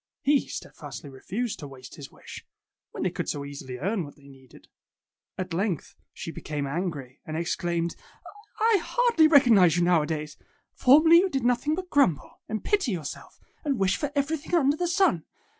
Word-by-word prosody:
He 285 0 +3
steadfastly 145 -4 -8
refused 210 - -4
to 145 - -7
waste 130 -2 -12
his 145 -5 -10
wish, - - -11 0.5
when - - -5
they - - 0
could - - -4
so 140 -1 -3
easily 140 -3 -7
earn 190 - -1
what 145 - -11
they 140 -1 -19
needed. 135 -2 -17 0.7
At 185 -2 -4
length 185 -1 -2 0.2
she 165 - -7
became 150 -3 -4
angry 145 -4 -4
and 155 0 -5
exclaimed, 170 0 -1 0.8
'H 400 - +3
hardly 475 -10 +3
recognize 225 - +6
you, 175 - +2
now 175 -2 +4
a 150 - -3
days! 150 -2 -4 0.4
Formerly 310 +6 +6
you 380 +2 +4
did 270 -7 -2
noth 245 +3 +1
ing 305 - +2
but 365 +1 -6
grumble, 180 - +1
and 215 0 -3
pity 395 - +1
yourself, 160 -6 -6 0.2
and 285 -4 0
wish 190 -2 +2
for 290 -2 -3
everything 285 +4 -1
under 290 -3 +3
the 350 +2 -1
sun. 345 - +2
185 Hz, 180 wpm, -26 LUFS, -, 0.8 s, recognize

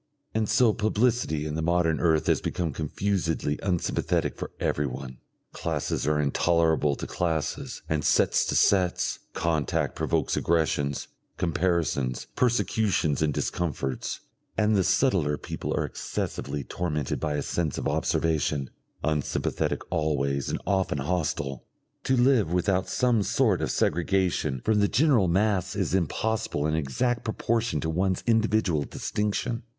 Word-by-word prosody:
And 110 -1 0
so 115 0 +4
publicity 110 -7 +1
in 75 - -3
the 80 - -2
modern 85 -1 +2
earth 80 -3 +2
has - - +2
become 85 -4 -2
confusedly 80 -1 -1
unsympathetic 90 -3 0
for - - -5
everyone. 65 -3 -2 0.3
Classes 80 -3 -2
are 75 0 +2
intolerable 80 0 +2
to - - -6
classes 80 -4 -2
and 80 -2 -1
sets - - +3
to - - -1
sets, 95 -3 +2 0.2
contact 80 -3 0
provokes - - 0
aggressions, 75 -4 0 0.3
comparisons, 85 -7 0
persecutions 110 - +1
and 80 -1 +2
discomforts, 70 -4 -2 0.4
and 105 0 +3
the 95 - +3
subtler 85 - +2
people - - -5
are - - +1
excessively 75 -2 -4
tormented 75 -2 -2
by 75 -1 -1
a 70 - -1
sense 80 -5 -1
of - - -2
observation, 75 -4 0 0.3
unsympathetic 75 -3 -1
always 70 -3 0
and - - -2
often 95 -6 +1
hostile. 75 -3 -2 0.4
To 130 - +2
live 120 -8 +3
without 90 +1 +1
some 125 -4 +2
sort - - +2
of - - -1
segregation 90 -6 0
from 110 -1 +3
the 100 - +4
general 125 - +3
mass 95 +1 +1
is 95 -5 -1
impossible 95 -2 0
in 75 - 0
exact 80 - 0
proportion 115 -4 0
to 80 - -2
one's 95 +2 0
individual 110 -8 +2
distinction. 105 +3 -2
85 Hz, 135 wpm, -27 LUFS, 75-105 Hz, 0.4 s, so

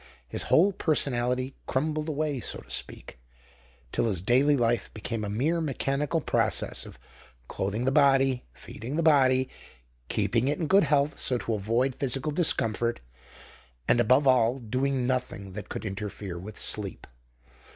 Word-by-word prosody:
His - - -5
whole 190 +5 +5
personality 130 -5 0
crumbled 155 +3 -1
away, 150 -2 -1
so - - -4
to - - -20
speak, - - -3 0.7
till - - 0
his 100 -6 0
daily 130 - +3
life 120 -3 0
became 110 +1 -4
a 105 - -3
mere 150 +11 0
mechanical 145 +1 -1
process - - 0
of - - -12 0.5
clothing 105 +5 -2
the 130 - +2
body, 135 -3 +3
feeding 115 - -8
the 165 - 0
body, 130 -4 +4 0.6
keeping 120 +2 +1
it 145 - 0
in 165 - -2
good 195 +3 +4
health 145 0 +1
so 125 - 0
as 120 - -2
to 115 - -1
avoid 115 +6 0
physical 135 +3 -1
discomfort, 120 -8 +1 0.9
and, - - +4
above 130 +5 +4
all, 125 -1 +4
doing 130 +2 -1
nothing 125 -6 -2
that 105 +1 -7
could - - -5
interfere 100 -2 -5
with 100 +4 -9
sleep. 100 -4 -2
130 Hz, 150 wpm, -27 LUFS, 115-145 Hz, 0.9 s, whole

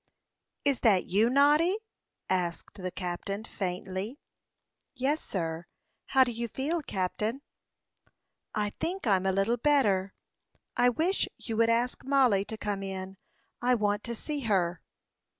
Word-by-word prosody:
"Is 280 -3 +2
that 195 -6 +4
you, 210 +6 +3
Noddy?" 295 +8 +4 0.5
asked 180 +1 -2
the 185 - -2
captain, 185 +3 -4
faintly. 190 +4 -4 0.8
"Yes, 280 +4 0
sir. 165 -2 -3 0.4
How 265 -1 +6
do 250 - -2
you 235 +1 -3
feel, 295 +9 -2
captain?" 215 +3 -2 1.1
"I 210 -1 0
think 370 0 -2
I'm 195 -3 +3
a - - +4
little 195 +5 +1
better. 210 -9 +2 0.6
I 245 - +5
wish 335 +10 +1
you 225 - -5
would 230 0 +4
ask 235 +2 +1
Mollie 260 -8 +3
to 220 - -6
come 205 -2 -2
in; 190 0 -5 0.4
I 250 +1 +4
want 205 -2 0
to 235 - -3
see 295 +5 -3
her." 185 -8 +1
220 Hz, 135 wpm, -29 LUFS, 190-265 Hz, 1.1 s, How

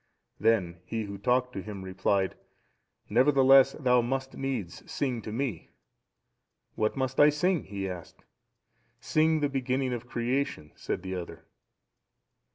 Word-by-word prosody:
Then 95 -6 +2
he 115 -1 -3
who 100 -1 -7
talked 125 +4 +1
to 95 - -4
him 100 -1 -7
replied, 95 +1 0 0.7
"Nevertheless 135 +2 +5
thou 125 -4 +3
must 135 +2 -3
needs 120 -11 -4
sing 125 -5 -1
to 110 - -7
me." 115 -6 -3 1.0
"What 110 +4 -1
must 130 -1 -1
I 145 - +8
sing?" 170 +4 +1
he 100 -1 -4
asked. 90 -4 -9 0.7
"Sing 155 0 +2
the 145 - +3
beginning 130 -1 -1
of 120 0 -5
creation," 120 - -2
said - - -4
the 95 0 -4
other. 90 -2 -7
125 Hz, 135 wpm, -28 LUFS, 100-135 Hz, 1.0 s, I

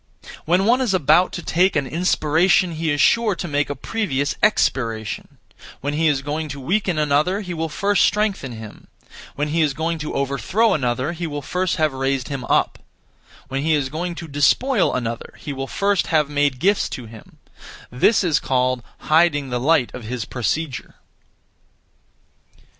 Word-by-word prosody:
When 180 +4 +2
one 245 +4 +3
is 225 -7 +1
about 175 +2 +4
to 175 - -5
take 185 +2 +2
an 150 -3 +1
inspiration, 170 +3 +2
he 160 0 -2
is 145 -1 0
sure 225 +1 +3
to 175 - -5
make 145 -2 0
a 145 - -3
(previous) 150 -12 -2
expiration; 115 - 0 0.4
when 145 +2 -2
he 160 +2 +2
is 140 -3 +1
going 150 +2 -3
to 140 0 -6
weaken 180 +4 0
another, 150 +6 +1
he 180 -3 -5
will 165 -1 -3
first 200 +4 +1
strengthen 200 - 0
him; 110 -2 -11 0.5
when 150 +1 -2
he 165 +2 +1
is 145 -3 +1
going 165 +1 -2
to 150 - -5
overthrow 140 - +1
another, 130 0 -1
he 170 0 -4
will 145 -2 -5
first 180 +5 -1
have 155 -3 +1
raised 135 -1 -1
him 135 -3 -4
up; - - +1 0.7
when 135 +1 -3
he 160 +1 +2
is 140 -3 -1
going 170 +4 -4
to 170 -1 -7
despoil 190 - +2
another, 120 -2 -4
he 145 - -6
will 135 0 -5
first 200 +3 0
have 155 -3 +2
made 145 -2 +1
gifts 195 +9 +1
to 125 - -7
him: 110 -1 -14 0.5
this 160 - +3
is 165 -5 +2
called 130 -1 0 0.2
'Hiding 155 -4 +2
the 125 - -1
light 140 -1 +2
(of 125 -3 -8
his 120 0 -4
procedure).' 130 +3 -3
150 Hz, 175 wpm, -21 LUFS, 135-175 Hz, 0.7 s, about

